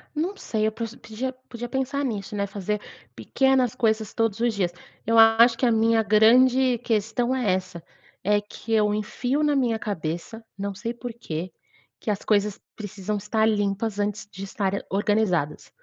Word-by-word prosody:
Não 340 +7 -1
sei, 215 - -1
eu 220 - +1
pod 230 +1 -6 0.5
podia 240 0 -6
pensar 270 +2 -1
nisso, 210 -3 -4
né, 200 0 0
fazer 205 +1 -3 0.3
pequenas 265 -3 +1
coisas 220 -2 0
todos 225 -2 0
os 235 -1 +1
dias. 185 -4 0 0.3
Eu 230 +1 +2
acho 225 +1 +7
que 255 - +1
a 235 - +4
minha 225 0 +3
grande 245 +4 +5
questão 225 +3 0
é 245 -7 +1
essa: 185 -2 -3 0.4
é 205 +2 +3
que 205 +2 -10
eu 210 -2 +3
enfio 245 +7 -1
na 295 -1 +2
minha 240 -4 +1
cabeça, 175 +1 -4 0.2
não 200 0 -3
sei 230 +4 -4
porquê, 225 -8 -6 0.5
que - - -5
as 205 -1 -1
coisas 205 -1 +1 0.2
precisam 205 0 -4
estar 215 +2 0
limpas 205 0 0
antes 205 +1 -2
de 195 +1 -7
estarem 195 0 -1
organizadas. 195 -7 0
220 Hz, 165 wpm, -25 LUFS, 200-235 Hz, 0.5 s, acho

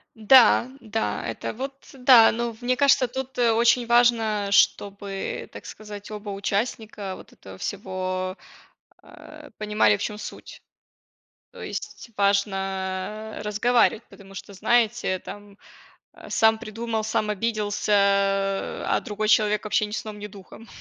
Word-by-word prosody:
Да, 240 +2 +6
да, 220 -1 -3
это, - - -5
вот, 270 +4 -5 0.2
э, - - -14
да. 250 -3 +7
Но 235 +1 -2
в 225 - -20
мне 250 +1 +1
кажется, 270 -2 +4
тут 265 +1 -6
очень 235 +1 +3
важно, 225 -4 +3
чтобы, 200 0 0
так - - -11
сказать, 210 -1 -10
оба 210 0 -7
участника 200 0 -3
вот - - -14
этого 95 -1 -13
всего, 185 - -4 0.7
э, 305 -1 -14
понимали, 210 - +2
в - - -7
чем 210 0 -4
суть. 210 - -10 0.9
То - - -12
есть, - - -7
важно 195 +1 -1
разговаривать, 225 +2 +2
потому 195 -1 -15
что, 200 - -9
знаете, 225 -2 +1
там, 205 -1 -11 0.6
э, - - -13
сам 220 0 +3
придумал, 225 0 -4
сам 215 -1 -1
обиделся, 210 -1 -1 0.9
а - - +2
другой 210 0 -3
человек, 210 -1 +3
вообще, 215 0 +1
ни - - -11
сном, 215 -2 -5
ни 210 - -6
духом. 205 +3 -14
215 Hz, 135 wpm, -24 LUFS, 200-235 Hz, 0.9 s, да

